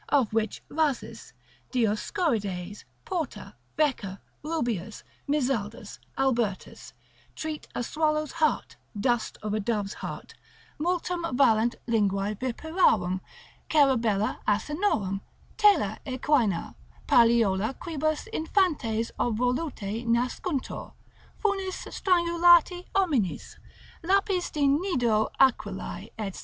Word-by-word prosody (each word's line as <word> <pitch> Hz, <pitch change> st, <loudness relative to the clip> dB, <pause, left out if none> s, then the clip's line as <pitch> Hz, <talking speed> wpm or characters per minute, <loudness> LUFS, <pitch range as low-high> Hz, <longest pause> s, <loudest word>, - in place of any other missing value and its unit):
of 260 Hz, -7 st, +2 dB
which 220 Hz, -2 st, -1 dB
Rhasis, 300 Hz, -4 st, -2 dB, 0.4 s
Dioscorides, 210 Hz, -, -1 dB, 0.2 s
Porta, 340 Hz, -6 st, -4 dB, 0.2 s
Wecker, 250 Hz, -11 st, 0 dB, 0.3 s
Rubeus, 235 Hz, -, -3 dB, 0.3 s
Mizaldus, 240 Hz, -7 st, -1 dB, 0.2 s
Albertus, 235 Hz, -7 st, -1 dB, 0.4 s
treat: 310 Hz, -1 st, -5 dB
a 245 Hz, -, -1 dB
swallow's 305 Hz, +2 st, 0 dB
heart, 315 Hz, -2 st, 0 dB, 0.2 s
dust 240 Hz, +1 st, 0 dB
of 210 Hz, -1 st, -2 dB
a 215 Hz, -, 0 dB
dove's 205 Hz, -2 st, -1 dB
heart, -, -, -7 dB, 0.5 s
multum 355 Hz, +1 st, -1 dB, 0.2 s
valent 235 Hz, -3 st, +4 dB
linguae 205 Hz, -3 st, +1 dB
viperarum, 240 Hz, -, +1 dB, 0.5 s
cerebella 235 Hz, -9 st, +2 dB
asinorum, 210 Hz, -, 0 dB, 0.3 s
tela 375 Hz, -, +4 dB
equina, 255 Hz, -, +1 dB, 0.3 s
palliola 230 Hz, -1 st, +4 dB
quibus 310 Hz, -2 st, -2 dB
infantes 300 Hz, -, 0 dB
obvoluti 240 Hz, -2 st, -1 dB
nascuntur, 250 Hz, +5 st, -1 dB, 0.5 s
funis 390 Hz, -3 st, -1 dB
strangulati 345 Hz, 0 st, +4 dB
hominis, 295 Hz, -, 0 dB, 0.4 s
lapis 385 Hz, 0 st, +1 dB
de 290 Hz, -2 st, +1 dB
nido 260 Hz, -, +2 dB
Aquilae, 205 Hz, -6 st, +1 dB, 0.2 s
&c. -, -, -9 dB
250 Hz, 90 wpm, -27 LUFS, 215-320 Hz, 0.5 s, valent